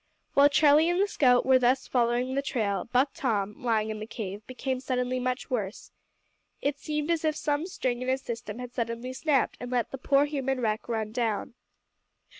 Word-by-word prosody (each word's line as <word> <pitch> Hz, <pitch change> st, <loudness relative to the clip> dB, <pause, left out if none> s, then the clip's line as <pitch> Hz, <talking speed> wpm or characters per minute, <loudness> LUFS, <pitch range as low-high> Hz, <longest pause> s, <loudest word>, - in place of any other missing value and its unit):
While 280 Hz, +1 st, +6 dB
Charlie 300 Hz, +2 st, +5 dB
and 350 Hz, +1 st, +1 dB
the 400 Hz, -, +4 dB
scout 250 Hz, -9 st, +3 dB
were 260 Hz, -1 st, +5 dB
thus 255 Hz, +2 st, +2 dB
following 245 Hz, +1 st, +1 dB
the 275 Hz, -, +1 dB
trail, 210 Hz, -8 st, -1 dB
Buck 260 Hz, +3 st, +3 dB
Tom, 210 Hz, -5 st, -2 dB
lying 220 Hz, -2 st, +1 dB
in 215 Hz, -, -5 dB
the 215 Hz, -, -6 dB
cave, 205 Hz, -3 st, -6 dB
became 260 Hz, 0 st, -3 dB
suddenly 255 Hz, -1 st, -1 dB
much 255 Hz, +1 st, -3 dB
worse. 210 Hz, -5 st, -3 dB, 0.7 s
It 285 Hz, 0 st, -1 dB
seemed 300 Hz, +1 st, -2 dB
as 330 Hz, -1 st, 0 dB
if 310 Hz, -1 st, +1 dB
some 300 Hz, +2 st, -1 dB
string 255 Hz, -9 st, -2 dB
in 255 Hz, -, -4 dB
his 260 Hz, +1 st, 0 dB
system 230 Hz, -2 st, -5 dB
had 250 Hz, 0 st, -7 dB
suddenly 235 Hz, +1 st, -3 dB
snapped 275 Hz, 0 st, +1 dB
and 245 Hz, -, -6 dB
let 245 Hz, -2 st, -1 dB
the 270 Hz, -, -6 dB
poor 280 Hz, +1 st, +3 dB
human 270 Hz, -3 st, -2 dB
wreck 220 Hz, -1 st, -1 dB
run 220 Hz, -2 st, -2 dB
down. 225 Hz, -2 st, -1 dB
255 Hz, 195 wpm, -28 LUFS, 230-280 Hz, 0.7 s, While